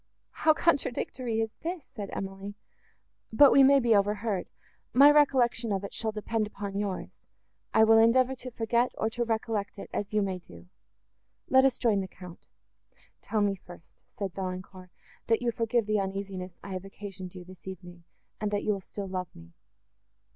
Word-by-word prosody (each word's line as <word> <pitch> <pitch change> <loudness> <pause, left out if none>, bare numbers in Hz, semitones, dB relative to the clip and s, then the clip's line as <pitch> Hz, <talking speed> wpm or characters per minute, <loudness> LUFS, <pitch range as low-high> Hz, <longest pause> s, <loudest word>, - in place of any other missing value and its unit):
"How 315 - +3
contradictory 255 -7 0
is 225 -1 -3
this!" 335 -4 -5
said 205 -5 -6
Emily;—"but 200 +6 -1
we 275 - +7
may 275 +1 +7
be 235 -3 +3
overheard. 205 -1 0 0.5
My 280 +3 +8
recollection 250 -6 +3
of 195 0 -1
it 200 - -6
shall 220 -1 -2
depend 215 0 -2
upon 200 -1 -6
yours; 200 -3 -4 0.5
I 220 - +5
will 225 0 +6
endeavour 250 +3 +4
to 255 - -7
forget, 235 +1 0
or 220 - 0
to 240 +1 -1
recollect 220 -3 -2
it, - - -9
as 205 - -3
you 210 -1 +2
may 190 -2 -2
do. 85 - -15 0.8
Let 265 0 +6
us 265 -2 +2
join 215 -5 +2
the 190 - -5
Count."—"Tell 180 +4 -9
me 205 -1 +2
first," 175 -3 -14
said 195 -3 -5
Valancourt, 185 -1 -6 0.4
"that 230 +1 +2
you 240 - +1
forgive 230 0 0
the 215 0 +1
uneasiness 190 -2 -4
I 195 - -6
have 185 0 -4
occasioned 195 -2 -8
you, 180 - -8
this 185 +1 -15
evening, 175 -2 -9 0.4
and 210 - -1
that 205 0 -1
you 210 - +2
will 195 - -5
still 200 +2 -7
love 185 -1 -3
me." 85 0 -14
210 Hz, 170 wpm, -29 LUFS, 190-235 Hz, 0.8 s, My